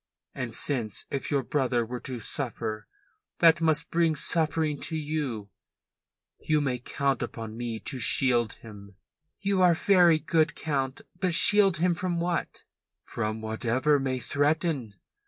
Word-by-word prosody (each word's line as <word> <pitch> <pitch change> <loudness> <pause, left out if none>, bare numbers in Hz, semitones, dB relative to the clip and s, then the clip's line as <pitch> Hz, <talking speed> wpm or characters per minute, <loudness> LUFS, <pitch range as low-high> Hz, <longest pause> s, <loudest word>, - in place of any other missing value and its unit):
And 120 -3 -5
since 115 -8 -3
if 140 - -3
your 140 -2 0
brother 125 -4 0
were 125 +2 -6
to 130 0 -6
suffer 110 -3 -4 0.5
that 165 0 +5
must 160 0 +1
bring 165 -2 +2
suffering 155 -1 0
to 165 - -2
you, 145 -10 -3 0.9
you 155 -1 +1
may 130 -4 -1
count 135 +1 -1
upon 110 -1 -6
me 115 -1 -4
to 135 - -5
shield 120 -2 +2
him." 100 -3 -13 0.5
"You 195 -1 +1
are 175 -2 +5
very 175 -3 +5
good, 160 +1 +1
Count. 135 -4 -2 0.2
But 180 -3 +2
shield 195 -1 +5
him 175 +2 +2
from 175 0 -2
what?" 175 0 -3 0.4
"From 110 -1 -4
whatever 120 +6 +1
may 130 -1 -1
threaten. 145 - -1
140 Hz, 140 wpm, -27 LUFS, 120-165 Hz, 0.9 s, that